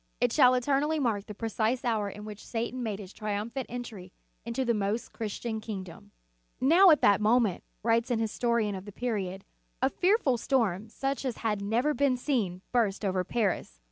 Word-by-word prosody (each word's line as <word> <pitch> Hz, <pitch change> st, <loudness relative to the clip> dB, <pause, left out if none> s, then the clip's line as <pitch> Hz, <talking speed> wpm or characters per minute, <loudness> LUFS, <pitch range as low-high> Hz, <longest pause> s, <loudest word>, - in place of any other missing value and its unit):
It 245 Hz, -1 st, +2 dB
shall 255 Hz, -4 st, +6 dB
eternally 280 Hz, +5 st, +1 dB
mark 225 Hz, -8 st, -1 dB
the 210 Hz, -, -7 dB
precise 225 Hz, +3 st, -1 dB
hour 215 Hz, -4 st, 0 dB
in 210 Hz, +2 st, -9 dB
which 210 Hz, -1 st, -9 dB
Satan 235 Hz, +2 st, -3 dB
made 215 Hz, -4 st, -2 dB
his 195 Hz, -2 st, -10 dB
triumphant 215 Hz, +5 st, -3 dB
entry 225 Hz, -7 st, -7 dB, 0.3 s
into 235 Hz, +3 st, -2 dB
the 235 Hz, -, +2 dB
most 210 Hz, +2 st, -2 dB
Christian 220 Hz, +1 st, -4 dB
kingdom. 190 Hz, -, -7 dB, 0.5 s
"Now, 340 Hz, +9 st, +6 dB
at 310 Hz, -, +5 dB
that 200 Hz, 0 st, +5 dB
moment," 220 Hz, -3 st, +2 dB, 0.2 s
writes 230 Hz, +2 st, +2 dB
an 240 Hz, -2 st, +1 dB
histo 225 Hz, +2 st, -1 dB
rian 220 Hz, -4 st, +1 dB
of 190 Hz, 0 st, -7 dB
the 205 Hz, -, -8 dB
period, 195 Hz, -5 st, -3 dB, 0.3 s
"a -, -, +2 dB
fearful 360 Hz, -, +2 dB
storm, 220 Hz, -6 st, 0 dB
such 270 Hz, +4 st, -3 dB
as 255 Hz, -4 st, -2 dB
had 210 Hz, -2 st, 0 dB
never 235 Hz, +9 st, +1 dB
been 275 Hz, -3 st, +2 dB
seen, 215 Hz, -9 st, -1 dB
burst 215 Hz, -4 st, +1 dB
over 185 Hz, -1 st, +1 dB
Paris. 190 Hz, -, -1 dB
225 Hz, 180 wpm, -29 LUFS, 205-250 Hz, 0.5 s, shall